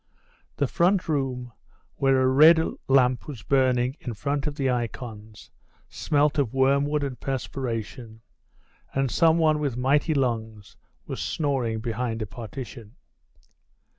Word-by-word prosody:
The 140 - +1
front 175 +7 +1
room, 130 -5 -2 0.5
where 135 -1 +3
a - - +3
red 155 +5 +7 0.3
lamp 130 -3 +3
was 130 -8 -8
burning 130 0 +1
in 120 -3 -6
front 140 +6 -2
of 145 - -3
the 135 -2 -1
icons, 110 -3 -6 0.4
smelt 145 0 +1
of 135 -3 -1
wormwood 140 +2 +2
and 130 -4 -4
perspiration, 120 -4 -5 0.7
and 135 -2 0
some 165 -1 +4
one 155 -2 +3
with 140 -5 -2
mighty 145 +5 +2
lungs 110 -6 -2 0.3
was - - -5
snoring 130 -7 -1
behind 115 0 -3
a - - -3
partition. 115 +1 -9
130 Hz, 130 wpm, -25 LUFS, 115-145 Hz, 0.7 s, red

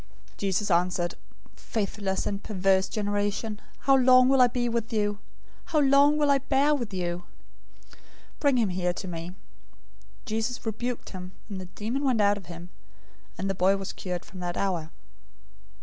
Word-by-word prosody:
017:017 - - -29
Jesus 200 0 0
answered, 175 0 +1 0.4
"Faithless 200 -2 -2
and 200 0 -2
perverse 190 -2 +1
generation! 205 +1 -2 0.2
How 270 0 +5
long 255 -1 +6
will 265 -1 +5
I 250 - +8
be 240 0 -1
with 235 0 -2
you? 205 -2 0 0.5
How 320 - -1
long 285 +1 +5
will 295 -1 +3
I 275 - +4
bear 280 +2 +2
with 240 -7 -2
you? 175 -1 -3 1.1
Bring 280 -3 +3
him 225 -4 +2
here 180 -1 0
to 190 - -6
me." 170 -1 -5 0.9
017:018 - - -28
Jesus 225 +3 -2
rebuked 235 +2 -3
him, 185 -1 -8 0.2
the 190 -2 -5
demon 215 +9 -4
went 255 -5 +2
out 205 0 +4
of 195 - -11
him, 170 +1 -9 0.7
and 195 - -2
the 195 - 0
boy 190 +1 +3
was 195 -1 -5
cured 180 -2 -5
from 190 - -11
that 175 -1 -3
hour. 175 -5 -1
205 Hz, 165 wpm, -27 LUFS, 185-245 Hz, 1.1 s, I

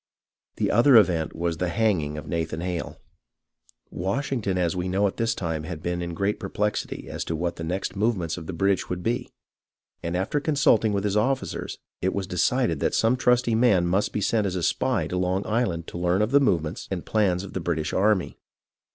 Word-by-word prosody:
The - - 0
other 120 +4 +6
event 85 -7 +3
was 85 0 -1
the 90 +1 -1
hanging 85 -8 0
of 75 - -7
Nathan 80 -1 -2
Hale. 90 -1 -4 0.9
Washington, 100 +1 -1
as 85 -2 0
we 90 0 -2
know, 95 +3 +2
at 100 - -1
this 115 0 0
time 80 -4 -2
had 80 0 -7
been 85 0 -2
in 85 -1 -4
great 100 +4 -1
perplexity 105 +2 -2
as - - -4
to 80 - -2
what 85 +2 -2
the 80 - -5
next 90 +4 -3
movements 95 -6 0
of 80 -3 -8
the - - -3
British 95 +3 +1
would 90 -1 -3
be, 120 +2 -1 0.7
and 85 +1 -2
after 100 +10 0
consulting 140 -7 +3
with 100 -1 -1
his 105 -1 0
officers 130 +5 -1 0.2
it 95 +1 0
was 100 -1 -1
de 90 -1 -4
cided 125 +6 +2
that - - 0
some 115 +3 +3
trusty 125 -2 +2
man 110 -6 +4
must 95 +4 +1
be 105 - -2
sent 105 0 +1
as 95 - -3
a 90 - -2
spy - - +1
to 90 - -3
Long 90 +2 0
Island 100 -7 0
to 85 - -6
learn 90 +3 +2
of 105 - -1
the 140 - +6
movements 85 - 0
and 95 -3 -4
plans 95 -4 +1
of 100 - -9
the - - -2
British 80 -3 -2
army. 100 -1 +1
95 Hz, 210 wpm, -25 LUFS, 85-110 Hz, 0.9 s, other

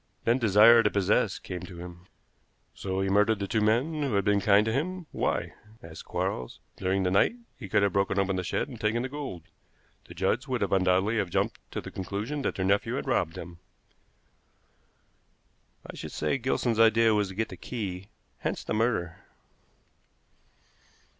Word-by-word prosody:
Then 120 +3 +2
desire 115 +1 +7
to 105 - +2
possess 100 +1 +1
came 90 -1 -6
to 90 0 -10
him." 90 +1 -10 0.7
"So 95 0 -3
he 95 - 0
murdered 105 +2 +3
the 100 - -3
two 110 +3 0
men 125 +9 +1
who 140 -5 -1
had 100 -1 +1
been 105 -1 +3
kind 105 +1 +4
to 110 - 0
him. 180 +6 -2
Why?" - - -1 0.3
asked 80 -1 -10
Quarles. 60 - -3 0.2
"During 95 +1 0
the 90 - +1
night 100 - +3 0.2
he 100 -6 -9
could 105 +1 +3
have 100 -2 +1
broken 100 0 +1
open 100 -1 +1
the 95 - -2
shed 90 - -1
and 125 -5 -10
taken 115 +3 0
the 130 - -3
gold. 135 - -6 0.6
The - - -11
Judds 105 - 0
would 125 -5 -1
undoubtedly 95 +3 +2
have 95 - -1
jumped - - -1
to - - -3
the - - -9
conclusion 105 +10 -4
that - - -2
their 95 - -1
nephew 100 +1 +1
had - - -3
robbed 80 - 0
them." 85 0 -9 2.3
"I - - -9
should - - -7
say 140 - -1
Gilson's 120 -2 0
idea 115 0 +5
was 105 -1 +1
to 95 - -9
get 110 +2 -1
the - - -8
key, 100 -5 -6 0.3
hence - - -3
the - - -3
murder." 110 -7 0
105 Hz, 180 wpm, -28 LUFS, 95-115 Hz, 2.3 s, desire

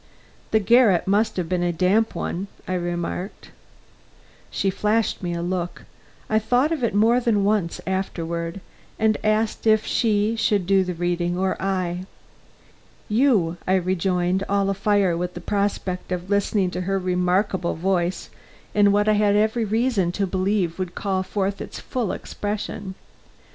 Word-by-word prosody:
"The 220 - +3
garret 215 -3 +4
must 205 +3 +1
have 180 -3 -1
been 180 +1 -1
a 175 0 +1
damp 190 +6 +1
one," 190 +4 -3 0.2
I 185 - -2
remarked. 175 +2 -4 1.0
She 195 - 0
flashed 210 +3 0
me 175 -2 -2
a 170 - -3
look 175 0 -3 0.4
I 215 - +2
thought 245 +7 +2
of 310 -6 -2
it 225 -4 0
more 225 +4 +4
than 225 -5 +1
once 200 -4 0
afterward 170 -2 -3 0.4
and 220 0 +2
asked 215 +1 0
if 220 0 +4
she 215 -1 +1
should 205 -4 +1
do 195 +1 +3
the 180 -1 -4
reading 175 0 -1
or 190 0 0
I. 185 -1 -2 1.0
"You," 210 -8 +2
I 190 - +3
rejoined, 185 0 0
all 200 0 +2
afire 195 -2 +2
with 180 +1 -3
the - - -5
prospect 195 -1 -2
of 180 +2 -3
listening 200 -2 +1
to 180 - -3
her 195 +2 0
remarkable 180 0 0
voice 180 +1 -1 0.4
in 205 -1 +5
what 205 +1 +2
I 215 - +5
had 205 -1 +3
every 220 +2 +2
reason 215 -4 +1
to 200 - 0
believe 190 -2 -1
would 180 -2 -4
call 190 -2 -1
forth 195 +1 -2
its - - -7
full 240 -7 -2
expression. 205 -2 -5
195 Hz, 155 wpm, -23 LUFS, 180-210 Hz, 1.0 s, in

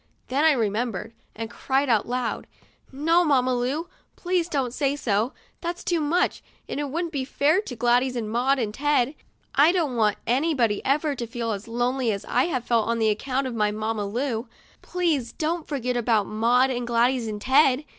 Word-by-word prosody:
Then 275 +4 +1
I 320 -1 +6
remembered, 225 -2 -2 0.2
and 225 +1 -4
I 235 - -16
cried 270 +3 0
out 225 -4 +2
loud: 245 -1 -2 0.3
" - - -33
No, 325 +6 +3
Mamma 255 -5 +2
Lu, 260 +7 -1 0.3
please 355 -1 -1
don't 265 -6 -1
say 280 0 0
so! 225 -2 0 0.3
That's 345 0 -4
too 345 -2 0
much, 315 +4 +1 0.3
and - - -4
it 290 -1 -2
would'nt 335 +4 -2
be 280 -4 -2
fair 295 +7 +2
to 270 -12 -7
Gladys 245 +2 +2
and 230 -3 -2
Maud 250 +5 +1
and 220 -5 -2
Ted. 285 0 +1 0.4
I 295 +4 +6
don't 325 -8 0
want 215 -2 +2
anybody 250 -4 +1
ever 290 +2 +1
to 240 -3 -5
feel 230 -1 -3
as 205 +1 -5
lonely 245 +1 0
as 200 -1 -4
I 250 - +2
have 255 -8 -2
felt 230 -3 +2
on 230 0 0
account 255 +5 0
of 255 - -3
my 210 -2 +1
Mamma 215 0 -2
Lu. 235 +2 -2 0.3
Please 320 -10 -1
don't 325 +1 -2
forget 250 -4 -2
about 225 -3 +2
Maud 240 +5 +2
and 245 -1 -3
Gladys 240 0 +2
and 210 -1 -4
Ted." 270 +3 +3
255 Hz, 195 wpm, -25 LUFS, 230-290 Hz, 0.4 s, I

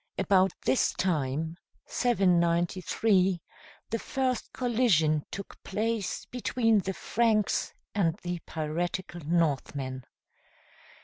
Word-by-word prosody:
About 190 -1 +4
this 265 - +3
time, 160 -2 -1 0.3
793, 185 -1 +2 0.5
the 230 - 0
first 260 -1 -1
collision 205 - +2
took 200 +1 -8
place 215 0 -2
between 230 -3 +1
the 190 0 -3
Franks 220 -2 +1 0.2
and 170 -6 +2
the 175 -1 -3
piratical 175 +3 -3
Northmen. 140 -5 0
185 Hz, 85 wpm, -29 LUFS, 165-220 Hz, 0.5 s, About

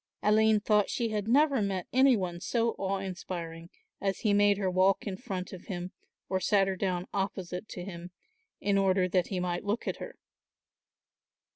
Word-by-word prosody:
Aline 215 0 +4
thought 210 -1 +3
she 235 -1 -1
had 210 -1 -2
never 275 +1 +4
met 195 -3 -1
any 260 -1 +5
one 175 -3 -3
so 230 +2 +1
awe 195 0 0
inspiring 175 -3 -6 0.3
as 195 -1 -1
he 210 -3 +2
made 205 0 +4
her 195 -2 -1
walk 185 +1 +3
in 200 -3 -3
front 190 -5 -5
of 185 - -10
him 180 -3 -5 0.4
or 190 - 0
sat 195 +1 +3
her 190 - -1
down 180 -1 -1
opposite 190 0 -3
to 180 - -6
him, 175 -2 -8 0.5
in 200 -1 +2
order 190 -1 +3
that 180 -1 +1
he 190 - -2
might 175 -1 -2
look 205 +3 -2
at - - -2
her. - - -8
195 Hz, 180 wpm, -30 LUFS, 180-210 Hz, 0.5 s, any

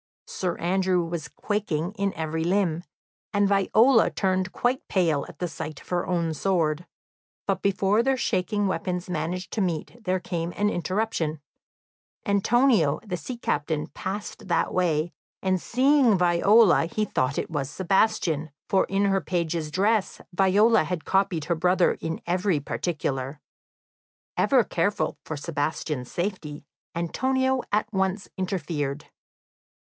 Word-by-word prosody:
Sir 180 -2 -3
Andrew 180 0 +1
was 165 -2 -4
quaking 180 -2 -2
in 200 -2 -1
every 160 0 -2
limb, 175 -2 +1 0.5
and 205 -1 +3
Viola 220 +5 +4
turned 185 -1 0
quite 250 +3 -1
pale 165 -7 +1
at - - -12
the 180 - -2
sight 155 -3 -6
of - - -18
her 175 -1 -1
own 170 -3 0
sword. 165 -1 0 0.6
But - - 0
before 200 +2 +2
their 265 +2 +1
shaking 205 -2 0
weapons 180 -1 -2
managed 175 +3 -3
to 220 - -1
meet 185 +6 -3
there 185 -2 0
came 170 -1 -3
an 210 +1 +1
interruption. 175 -3 -1 0.9
Antonio, 205 - +3
the 190 -4 -3
sea 240 +8 -6
captain, 150 -6 -1
passed 200 +2 -5
that 170 - +1
way, 170 -2 +1 0.3
and 185 -2 +1
seeing 260 -3 +4
Viola, 180 +3 +5
he 215 +5 -1
thought 130 -7 -1
it - - -3
was 140 -3 -2
Sebastian, 170 -3 +1 0.2
for 190 - +3
in 195 +1 +1
her 195 -1 +2
page's 170 -3 -2
dress 200 +5 +1
Viola 200 +3 +4
had 175 0 -4
copied 185 -5 +1
her 170 - +1
brother 180 +2 +3
in 160 0 -4
every 180 -1 +1
particular. 145 -3 -3 1.0
Ever 260 -4 +4
careful 200 +3 -1
for 155 - -5
Sebastian's 145 -3 -3
safety, 170 -6 -4 0.3
Antonio 260 +9 0
at 210 +1 +2
once 190 +1 0
interfered. 155 -6 -3
180 Hz, 135 wpm, -26 LUFS, 160-200 Hz, 1.0 s, Viola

